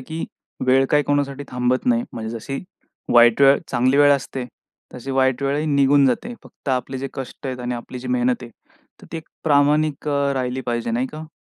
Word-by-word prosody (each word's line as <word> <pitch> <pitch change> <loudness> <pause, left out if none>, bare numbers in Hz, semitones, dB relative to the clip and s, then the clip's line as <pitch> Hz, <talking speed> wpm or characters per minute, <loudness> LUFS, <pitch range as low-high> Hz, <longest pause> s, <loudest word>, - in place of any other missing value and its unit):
की 160 +5 -5 0.4
वेळ 130 +1 +4
काय 150 0 +4
कोणासाठी 145 -1 -1
थांबत 125 - -1
नाही. 245 -1 +3
म्हणजे 115 +1 -5
जशी 135 +4 -5 0.5
वाईट 120 +1 +6
वेळ 140 0 +7
चांगली 130 +2 +2
वेळ 145 0 +6
असते, 135 -1 -2 0.5
तशी 125 +2 -7
वाईट 130 0 +1
वेळही 145 +3 0
निघून 140 -1 +4
जाते. 185 - -1
फक्त - - -12
आपले 130 0 -1
जे 135 - -4
कष्ट 135 +1 -7
आहेत 130 -1 -4
आणि 125 0 -3
आपली 120 +1 -7
जी 125 - -7
मेहनत 125 0 +1
आहे, 120 - -9 0.5
तर - - -12
ती - - -3
एक 160 - -9 0.2
प्रामाणिक 150 0 +2
अ, 140 -1 +1
राहिली 130 0 -2
पाहिजे, 120 -1 -2
नाही 120 +3 0
का. 155 +1 -8
135 Hz, 195 wpm, -21 LUFS, 125-145 Hz, 0.5 s, वेळ